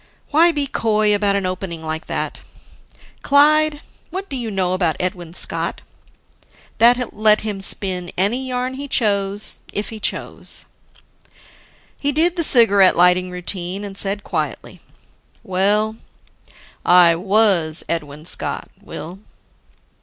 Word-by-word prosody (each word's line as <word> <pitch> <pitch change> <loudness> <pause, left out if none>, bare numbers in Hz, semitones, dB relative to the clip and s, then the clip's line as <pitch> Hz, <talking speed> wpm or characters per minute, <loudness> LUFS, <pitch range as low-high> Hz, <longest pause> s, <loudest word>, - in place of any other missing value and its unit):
Why 330 +3 +5
be 290 -3 -1
coy 215 -5 +1
about 205 -1 +1
an 200 -1 -1
opening 185 -3 -5
like 160 0 -5
that? - - -4 0.8
"Clyde, 300 +1 +3 0.3
what 385 +2 -6
do 275 - -5
you 240 -3 -4
know 185 -3 -1
about 175 -4 0
Edwin 175 -2 -4
Scott?" - - -3 1.0
That 245 +2 +3
let 215 0 +4
him 210 -3 -5
spin 185 -2 +1
any 235 +8 0
yarn 255 0 -3
he 280 +2 -6
chose 205 -4 0
if 205 - -3
he 220 - -8
chose. - - -5 1.3
He 285 - 0
did 330 +5 +1
the 340 - 0
cigarette 205 -9 +5
lighting 180 +1 +4
routine, 180 +1 -4
and 200 -1 -7
said 200 +1 -2
quietly, - - -5 0.6
"Well, 205 +4 +1 0.9
I 175 -1 +6
was 190 -4 +3
Edwin 150 -2 -4
Scott, - - -3
Will." 180 +4 -9
200 Hz, 125 wpm, -19 LUFS, 180-245 Hz, 1.3 s, I